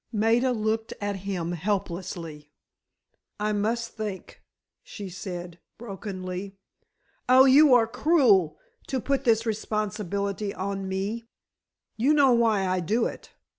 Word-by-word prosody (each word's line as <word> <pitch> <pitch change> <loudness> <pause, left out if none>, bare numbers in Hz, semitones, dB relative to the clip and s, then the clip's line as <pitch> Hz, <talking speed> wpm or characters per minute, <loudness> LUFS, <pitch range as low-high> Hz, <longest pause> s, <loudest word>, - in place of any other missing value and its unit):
Maida 230 +3 +2
looked 220 -1 -2
at 205 -1 -2
him 185 -3 -3
helplessly. 170 -4 -4 0.9
"I 210 0 0
must 230 +3 -1
think," 210 -4 -7 0.4
she 200 -3 -8
said, 175 -2 -7 0.2
brokenly. 195 -3 -6 0.7
"Oh, 260 +1 +8
you 275 0 +7
are 235 -2 +5
cruel, 225 - +3 0.3
to 265 - -1
put 275 +2 -1
this 225 -1 +3
responsibility 205 -2 -2
on 195 0 -3
me." 205 +5 -3 0.7
"You 270 +7 +3
know 280 -3 +5
why 225 -4 +2
I 185 0 0
do 215 +7 0
it. - - -6
210 Hz, 120 wpm, -26 LUFS, 190-230 Hz, 0.9 s, Oh